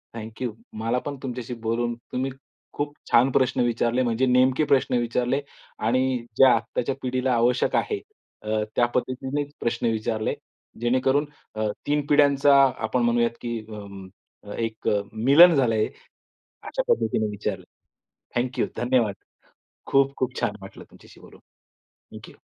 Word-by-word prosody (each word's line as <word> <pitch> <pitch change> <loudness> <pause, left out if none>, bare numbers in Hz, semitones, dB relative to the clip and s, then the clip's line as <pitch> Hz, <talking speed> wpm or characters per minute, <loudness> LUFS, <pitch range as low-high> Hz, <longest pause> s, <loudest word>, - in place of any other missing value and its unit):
Thank 110 +1 -8
you. 120 -3 -1 0.2
मला 115 +3 -1
पण 145 -1 -3
तुमच्याशी 125 -1 -5
बोलून 120 +1 0 0.2
तुम्ही 130 +1 -2 0.4
खूप 145 0 -3 0.2
छान 125 +3 +5
प्रश्न 130 -1 +2
विचारले 120 +1 +1
म्हणजे 120 +2 +1
नेमके 130 +3 +3
प्रश्न 130 -2 +3
विचारले 125 +3 0 0.4
आणि 130 +2 +2 0.2
ज्या 135 -1 +7
आत्ताच्या 120 +3 -2
पिढीला 130 0 0
आवश्यक 120 +2 +2
आहे 420 -3 0 0.4
अ, 110 0 -1
त्या 120 - +4
पद्धतीनेच 135 +3 -2
प्रश्न 120 0 -1
विचारले. 110 0 -1 0.5
जेणेकरून 130 +4 +2 0.3
अ, 110 0 -1 0.2
तीन 145 -1 +1
पिढ्यांचा 140 -1 +4 0.2
आपण 115 +3 -1
म्हणूयात 120 0 +1
की 120 -1 -3
अं, 100 -3 -9 0.4
अ, 105 - -10
एक 115 -1 -4
अ, 100 -1 +2
मिलन 145 +10 +7
झालंय, 115 -5 +2 0.8
अशा - - -3
पद्धतीने 110 - 0
विचारलं. 100 -2 -4 0.7
Thank 125 +1 -1
you. - - +3
धन्यवाद. 120 -5 +1 0.7
खूप-खूप 135 -2 +1
छान 105 - 0
वाटलं 95 - -11
तुमच्याशी - - -17
बोलून. - - -16 0.8
Thank - - -12
you. - - -19
125 Hz, 140 wpm, -24 LUFS, 115-130 Hz, 0.8 s, ज्या